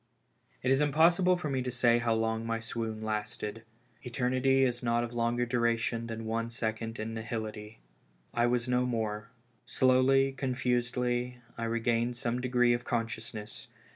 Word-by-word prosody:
I -, -, -1 dB
T -, -, +6 dB
is 135 Hz, -, +2 dB
impossible 170 Hz, +5 st, +4 dB
for 175 Hz, -, -4 dB
me 135 Hz, -2 st, 0 dB
to 125 Hz, -, -3 dB
say 120 Hz, -1 st, +3 dB
how 115 Hz, -1 st, +1 dB
long 110 Hz, 0 st, 0 dB
my 115 Hz, 0 st, -1 dB
swoon 115 Hz, -1 st, -4 dB
lasted. 105 Hz, 0 st, -3 dB, 0.4 s
Eternity 130 Hz, +2 st, +2 dB
is 120 Hz, -2 st, 0 dB
not 120 Hz, -1 st, +1 dB
of 120 Hz, 0 st, -5 dB
longer 120 Hz, +1 st, +1 dB
duration 115 Hz, -1 st, 0 dB
than 115 Hz, 0 st, -5 dB
one 115 Hz, +1 st, -1 dB
second 115 Hz, 0 st, -3 dB
in 110 Hz, +1 st, -4 dB
nihility. 110 Hz, -1 st, -5 dB, 0.6 s
I 120 Hz, 0 st, +3 dB
was 120 Hz, 0 st, 0 dB
no 125 Hz, 0 st, +2 dB
more. 110 Hz, -2 st, -2 dB, 0.4 s
Slowly, 130 Hz, +1 st, +4 dB
confusedly, 125 Hz, -1 st, -1 dB, 0.2 s
I 115 Hz, -, -3 dB
regained 115 Hz, +1 st, 0 dB
some 120 Hz, +1 st, -1 dB
degree 125 Hz, -1 st, +3 dB
of 120 Hz, 0 st, -2 dB
consciousness. 115 Hz, -2 st, -4 dB
120 Hz, 155 wpm, -30 LUFS, 115-125 Hz, 0.6 s, T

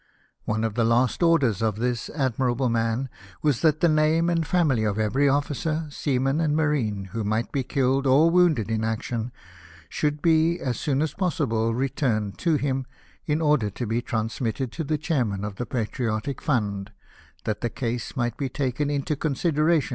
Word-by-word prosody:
One 110 Hz, +1 st, -1 dB
of 110 Hz, -2 st, -1 dB
the 115 Hz, +1 st, +1 dB
last 120 Hz, +6 st, +2 dB
orders 145 Hz, -, +3 dB
of 110 Hz, -2 st, +1 dB
this 120 Hz, +1 st, -2 dB
admirable 130 Hz, -2 st, 0 dB
man 115 Hz, +3 st, 0 dB, 0.4 s
was 145 Hz, -6 st, +2 dB
that 155 Hz, -2 st, +3 dB
the 170 Hz, -, +5 dB
name 160 Hz, +2 st, +3 dB
and 165 Hz, -2 st, 0 dB
family 155 Hz, -11 st, +2 dB
of 105 Hz, -1 st, 0 dB
every 130 Hz, +7 st, +2 dB
officer, 150 Hz, +3 st, -1 dB
seaman, 135 Hz, +1 st, 0 dB
and 150 Hz, -2 st, +1 dB
marine, 120 Hz, -11 st, 0 dB
who 115 Hz, -1 st, -2 dB
might 110 Hz, +3 st, -1 dB
be 140 Hz, -, 0 dB
killed 135 Hz, +1 st, +1 dB
or 150 Hz, +6 st, +5 dB
wounded 165 Hz, -, +3 dB
in 110 Hz, 0 st, 0 dB
action, 115 Hz, +1 st, -2 dB, 0.6 s
should 150 Hz, -1 st, -1 dB
be, 165 Hz, +1 st, +3 dB
as 125 Hz, -7 st, -2 dB
soon 145 Hz, -1 st, +1 dB
as 160 Hz, -, -2 dB
possible, 125 Hz, -, 0 dB
returned 120 Hz, -6 st, -1 dB
to 165 Hz, -2 st, +2 dB
him, 135 Hz, -3 st, -1 dB, 0.4 s
in 150 Hz, +2 st, +1 dB
order 150 Hz, -8 st, +3 dB
to 110 Hz, +5 st, -5 dB
be 115 Hz, +2 st, -1 dB
transmitted 115 Hz, +2 st, -2 dB
to 160 Hz, -, -4 dB
the 155 Hz, +1 st, -1 dB
Chairman 120 Hz, -, -1 dB
of 100 Hz, -2 st, -6 dB
the 120 Hz, -, -4 dB
Patriotic 115 Hz, +2 st, -2 dB
Fund, 105 Hz, -9 st, -1 dB, 0.5 s
that 105 Hz, -1 st, -3 dB
the 120 Hz, -, 0 dB
case 120 Hz, 0 st, -4 dB
might 120 Hz, -2 st, -1 dB
be 135 Hz, -2 st, -2 dB
taken 140 Hz, +2 st, -1 dB
into 145 Hz, +1 st, -1 dB
'onsirlprHlion 155 Hz, +2 st, +1 dB
f. 150 Hz, -, 0 dB
130 Hz, 175 wpm, -25 LUFS, 115-150 Hz, 0.6 s, the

